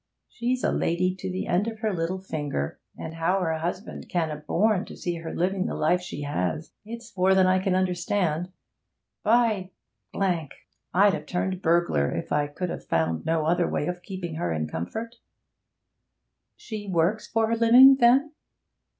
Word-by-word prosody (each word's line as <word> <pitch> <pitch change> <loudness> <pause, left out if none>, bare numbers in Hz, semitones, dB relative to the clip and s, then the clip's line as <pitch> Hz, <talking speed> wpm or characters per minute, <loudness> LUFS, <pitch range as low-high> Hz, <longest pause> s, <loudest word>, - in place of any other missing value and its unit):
She's 245 +2 -2
a - - +2
lady 180 +2 +1
to 190 0 -5
the 185 - -3
end 185 +5 +1
of 225 -1 -4
her 215 -2 0
little 170 +2 -2
finger, 145 - -4 0.2
and 160 - -6
how 165 +4 +1
her 160 -2 -1
husband 180 +5 -5
can 165 -3 0
'a 150 - -4
borne 185 +7 +1
to - - -11
see 175 -1 -3
her 165 0 -6
living 185 +2 0
the - - -3
life 175 +4 +2
she 165 -5 -6
has, 145 - -2
it's 230 0 -9
more 190 0 +3
than 190 -1 +5
I 185 0 +3
can 185 0 0
understand. 180 -2 0 0.7
By! 220 -4 +2 0.5
I'd 175 -7 0 0.6
have 150 0 -5
turned 185 +1 -2
burglar, 165 - +2
if 85 - -5
I 145 0 +1
could 175 +5 -4
'a - - -4
found 80 0 -1
no 160 -1 +1
other 175 +2 +2
way - - -1
of 180 +1 -4
keeping 180 -3 -6
her 85 - -1
in 75 -1 -1
comfort.' 220 - -5 1.4
'She 215 -2 -7
works 180 +5 +1
for 225 0 +1
her 230 +1 0
living, 250 +4 +8
then?' 265 +5 +4
180 Hz, 175 wpm, -26 LUFS, 160-205 Hz, 1.4 s, living